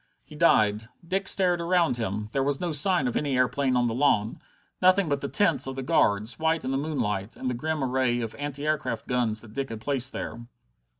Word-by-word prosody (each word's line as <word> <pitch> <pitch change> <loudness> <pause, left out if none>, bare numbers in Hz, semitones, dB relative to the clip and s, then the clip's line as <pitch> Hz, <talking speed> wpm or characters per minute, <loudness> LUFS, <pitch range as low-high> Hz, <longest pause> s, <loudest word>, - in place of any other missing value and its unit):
He 150 - -15
died. 110 -8 +3 0.2
Dick 195 +2 -1
stared 180 -3 +4
around 170 -6 +1
him. 105 -2 -3
There 135 - 0
was 140 0 0
no 175 -2 -2
sign 170 +1 +3
of 120 - -3
any 140 -3 0
airplane 130 +1 +1
on 125 - +2
the 115 - -1
lawn, 115 -5 +1 0.4
nothing 185 0 +4
but 140 -2 -1
the 140 - -3
tents 160 -10 +2
of 135 - -5
the 135 - -4
guards, 105 0 +1
white 160 -2 0
in 130 - -2
the 135 - 0
moonlight, 115 -9 -3
and 130 - -3
the - - -2
grim 155 +4 -2
array 130 -2 0
of 115 -1 -4
anti 145 0 -5
aircraft 150 -7 -2
guns 120 -4 -1
that 110 -2 -14
Dick 135 +2 -3
had 115 - -6
placed 130 0 -1
there. 115 - -6
135 Hz, 220 wpm, -26 LUFS, 120-155 Hz, 0.4 s, stared